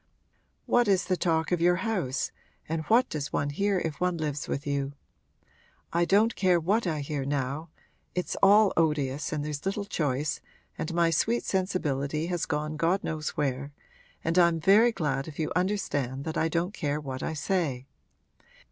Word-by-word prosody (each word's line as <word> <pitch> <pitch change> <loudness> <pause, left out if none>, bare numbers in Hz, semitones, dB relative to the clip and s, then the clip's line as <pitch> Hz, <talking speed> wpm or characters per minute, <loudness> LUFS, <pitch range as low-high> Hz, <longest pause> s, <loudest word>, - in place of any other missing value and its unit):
What 245 -2 +3
is 195 -2 +3
the 185 - +1
talk 165 -2 0
of 175 -2 +1
your 175 +1 +5
house 185 - -1 0.4
and 160 0 -1
what 245 +3 +4
does 150 -1 -4
one 145 0 -1
hear 200 +5 +1
if 160 -3 -3
one 180 -1 +1
lives 150 -2 -3
with 140 - -3
you? 140 -1 -1 1.0
I 170 +1 +3
don't 215 +5 +3
care 185 -3 +3
what 195 +6 +1
I 155 -3 -1
hear 140 -1 -3
now 140 +3 -2 0.5
(it's 180 - -2
all 205 +1 +6
odious 150 -3 0
and 150 -2 -2
there's 145 -1 -4
little 200 +1 -2
choice 150 -6 -1 0.3
and 160 - -4
my 170 -1 +3
sweet 230 +9 +1
sensibility 155 -6 -1
has 175 -1 -2
gone 150 +1 -2
God 170 +5 +1
knows 155 -1 -3
where!) 140 0 -1 0.5
and 165 +2 +2
I'm 170 -2 +4
very 210 +8 +5
glad 145 -9 -2
if 155 - -9
you 155 - -2
understand 145 -9 -1
that 160 - -3
I 160 - +2
don't 170 +4 -1
care 150 -6 -2
what 135 -3 -5
I - - -2
say. 150 -6 -1
160 Hz, 175 wpm, -28 LUFS, 145-185 Hz, 1.0 s, all